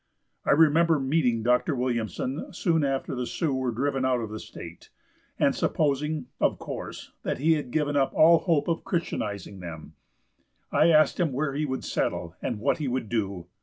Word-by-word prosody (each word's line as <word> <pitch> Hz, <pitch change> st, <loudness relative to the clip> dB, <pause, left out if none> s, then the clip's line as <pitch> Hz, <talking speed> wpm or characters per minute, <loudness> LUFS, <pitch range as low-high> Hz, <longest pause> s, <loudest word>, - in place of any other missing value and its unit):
I -, -, +3 dB
remember 160 Hz, +1 st, +4 dB
meeting 130 Hz, -5 st, +1 dB
Dr. 125 Hz, +5 st, +2 dB
Williamson 125 Hz, +2 st, -2 dB
soon 165 Hz, -4 st, +1 dB
after 135 Hz, -1 st, -1 dB
the 125 Hz, -1 st, -3 dB
Sioux 160 Hz, -5 st, -1 dB
were 130 Hz, -1 st, -1 dB
driven 135 Hz, +3 st, -1 dB
out 130 Hz, -1 st, +2 dB
of 110 Hz, -2 st, -5 dB
the 110 Hz, -, -5 dB
state, -, -, -11 dB, 0.5 s
and -, -, +3 dB
supposing, 150 Hz, -1 st, 0 dB
of -, -, +2 dB
course, -, -, -7 dB
that -, -, -2 dB
he 160 Hz, +4 st, +3 dB
had 150 Hz, -5 st, -2 dB
given 145 Hz, +1 st, 0 dB
up 135 Hz, -2 st, +2 dB
all 165 Hz, +1 st, +7 dB
hope 160 Hz, -4 st, +1 dB
of 165 Hz, -1 st, -1 dB
Christianizing 100 Hz, -, -3 dB
them, 80 Hz, -3 st, -8 dB, 0.8 s
I 160 Hz, -, +4 dB
asked 155 Hz, +2 st, +4 dB
him 170 Hz, -5 st, +2 dB
where 140 Hz, +1 st, -1 dB
he 150 Hz, +2 st, -1 dB
would 130 Hz, -1 st, -3 dB
settle, 85 Hz, +1 st, -2 dB
and 115 Hz, -, -2 dB
what 140 Hz, +9 st, 0 dB
he 150 Hz, -, -2 dB
would 125 Hz, -3 st, -2 dB
do. 100 Hz, -6 st, -2 dB
135 Hz, 180 wpm, -27 LUFS, 120-155 Hz, 0.8 s, all